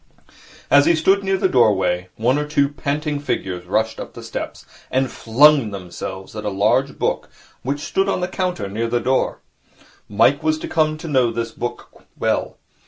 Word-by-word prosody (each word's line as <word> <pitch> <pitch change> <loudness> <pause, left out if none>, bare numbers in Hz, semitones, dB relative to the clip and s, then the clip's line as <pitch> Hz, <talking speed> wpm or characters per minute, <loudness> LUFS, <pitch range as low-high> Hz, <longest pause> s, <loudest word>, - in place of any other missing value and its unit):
As 145 0 +6
he 170 - +5
stood 190 +5 +3
near 195 0 +1
the 190 - +2
doorway, 95 - +2
one 125 +6 +1
or 150 - -2
two 145 -2 +2
panting 145 +1 -2
figures 90 -10 -3
rushed 110 +4 0
up - - -8
the - - -9
steps, - - -6 0.2
and 130 -1 0
flung 135 +1 +4
themselves 95 0 -7
at 105 - -5
a 105 - -1
large 110 +8 +1
book - - -1 0.3
which 140 +3 -3
stood 195 +5 0
on - - 0
the 180 - -1
counter 180 - -2
near 110 +4 -2
the 120 +1 0
door. 130 +3 0 0.7
Mike 115 +7 +3
was 155 0 +1
to - - -6
come 155 -2 +1
to 165 - -8
know 130 -6 +2
this 115 0 -3
book 120 +2 -7 0.2
well. - - -1
130 Hz, 180 wpm, -21 LUFS, 110-150 Hz, 0.7 s, As